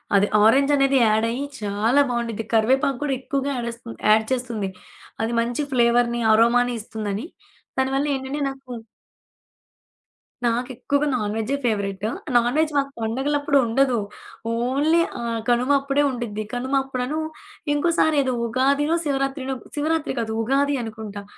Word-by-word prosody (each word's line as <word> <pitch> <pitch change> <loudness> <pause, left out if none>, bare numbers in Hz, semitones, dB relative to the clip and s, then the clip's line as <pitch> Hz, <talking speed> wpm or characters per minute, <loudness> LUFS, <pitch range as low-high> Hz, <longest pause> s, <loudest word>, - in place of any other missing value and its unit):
అది 200 +1 +4 0.2
ఆరెంజనేది 275 +3 +4
యాడయ్యి 230 +5 +1 0.2
చాలా 210 +7 +2
బావుండిద్ది. 235 -2 -2
కరివేపాకు 260 +4 +3
గూడా 285 -2 0
ఎక్కువగా 275 +1 -2
యాడేస్తు 235 -1 -6
యాడ్ 220 +1 +5
చేస్తుంది. 235 -6 -3 0.5
అది 225 - -1
మంచి 240 +4 -2
ఫ్లేవర్‌ని, 240 -1 +3
అరోమాని 245 +2 +4
ఇస్తుందని. 215 +1 -4 0.5
దానివల్ల 270 +2 +1
ఏంటంటే 265 +2 -4
నాకు 270 -1 -10 1.7
నాకెక్కువగా 250 +4 0
నాన్‌వెజ్జే 220 +2 -1
ఫేవరెట్. 200 -3 -1 0.3
నాన్‌వెజ్ 265 +7 +3
మాకు 275 0 0
పండుగలప్పుడు 280 +5 0
ఉండదు. 250 +2 +2 0.5
ఓన్లీ 275 +8 +2 0.2
ఆహ్, 230 -1 -2
కనుమ 245 +2 +2
అప్పుడే 280 +1 +1
ఉండిద్ది. 230 -4 -4
కనుమ 255 +3 -3
అప్పుడను 265 +2 -3 0.6
ఇంకోసారి 315 0 +2
ఏదో 260 -1 -1
ఉగాదినో 280 +6 +2
శివరాత్రినో 270 -1 -1 0.2
శివరాత్రి 315 +1 0
కాదు. 225 -1 -2
ఉగాది 280 +4 +1
అనుకుంటా. 215 -2 -7
250 Hz, 115 wpm, -23 LUFS, 230-275 Hz, 1.7 s, యాడ్